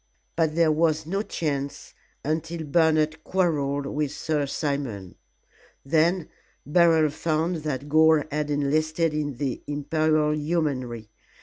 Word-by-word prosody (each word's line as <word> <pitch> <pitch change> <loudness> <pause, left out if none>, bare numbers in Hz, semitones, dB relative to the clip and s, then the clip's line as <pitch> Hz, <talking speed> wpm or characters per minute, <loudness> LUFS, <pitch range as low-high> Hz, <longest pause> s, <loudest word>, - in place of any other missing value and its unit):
But 160 -2 +1
there 165 -2 +4
was 160 0 +1
no 195 +5 -1
chance 140 -8 -4 0.3
until 160 +2 -2
Bernard 155 0 +2
quarrelled 145 -7 0
with 145 0 -2
Sir 150 -1 -1
Simon. 135 - -3 0.7
Then 165 +4 +2 0.4
Beryl 160 -1 +4
found 160 +2 -1
that 145 -3 -4
Gore 155 0 +4
had 150 0 -2
enlisted 155 +3 +1
in 145 -3 -2
the 135 -1 -3
Imperial 150 +1 +1
Yeomanry. 140 -8 -2
155 Hz, 115 wpm, -25 LUFS, 145-160 Hz, 0.7 s, there